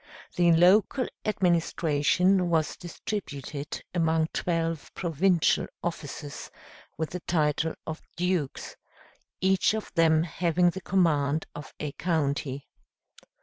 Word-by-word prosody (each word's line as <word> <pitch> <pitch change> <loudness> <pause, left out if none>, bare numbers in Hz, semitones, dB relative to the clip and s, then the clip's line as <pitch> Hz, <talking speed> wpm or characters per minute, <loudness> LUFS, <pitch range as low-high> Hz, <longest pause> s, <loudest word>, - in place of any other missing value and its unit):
The 175 -1 +4
local 195 +9 +4 0.2
administration 175 -1 +2
was 160 -2 +1
distributed 155 - -6
among 160 -2 +1
twelve 165 -2 -2
provincial 175 0 +2 0.2
officers, 150 -3 -5 0.5
with 160 -1 -3
the 180 - -4
title 160 -1 0
of 160 +1 -5
Dukes, 175 -5 -2 0.6
each 190 +3 +3
of 220 - -6
them 160 -2 +4
having 175 +1 +1
the 190 - -7
command 160 -6 +1
of 150 - -10
a 150 -2 -3
county. 140 -4 -1
165 Hz, 105 wpm, -27 LUFS, 150-180 Hz, 0.6 s, The